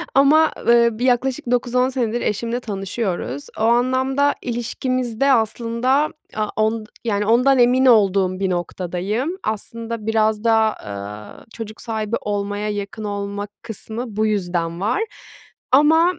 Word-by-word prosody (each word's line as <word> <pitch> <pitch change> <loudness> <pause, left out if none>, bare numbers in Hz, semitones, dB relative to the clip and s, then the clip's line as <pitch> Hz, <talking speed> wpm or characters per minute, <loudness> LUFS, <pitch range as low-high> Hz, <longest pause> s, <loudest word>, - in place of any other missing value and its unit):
ama, 300 +4 +5 0.2
ııı, 235 -1 +4
bir 250 - 0
yaklaşık 250 -1 +1
9-10 250 +1 +2
senedir 240 -3 -1
eşimle 235 +3 -1
tanışıyoruz. 195 - -4
O - - -3
anlamda 260 +4 +2
ilişkimizde 250 +1 -1
aslında 235 +4 +1 0.3
a 215 -1 0
on 220 0 0 0.2
yani 210 -3 0
ondan 250 +5 +4
emin 250 +2 +4
olduğum 195 -5 +4
bir 195 -1 0
noktadayım. 185 - -2
Aslında 225 +1 -4
biraz 220 -1 +1
da, 230 - +3
aaa, 105 - -3
çocuk 220 -2 -8
sahibi 220 -1 -2
olmaya 205 0 -2
yakın 205 +1 -5
olma 205 0 -4
kısmı 225 0 -6
bu 215 +1 +1
yüzden 175 -5 -1
var 220 - +1 0.7
ama 320 +6 +5
225 Hz, 125 wpm, -21 LUFS, 205-250 Hz, 0.7 s, ama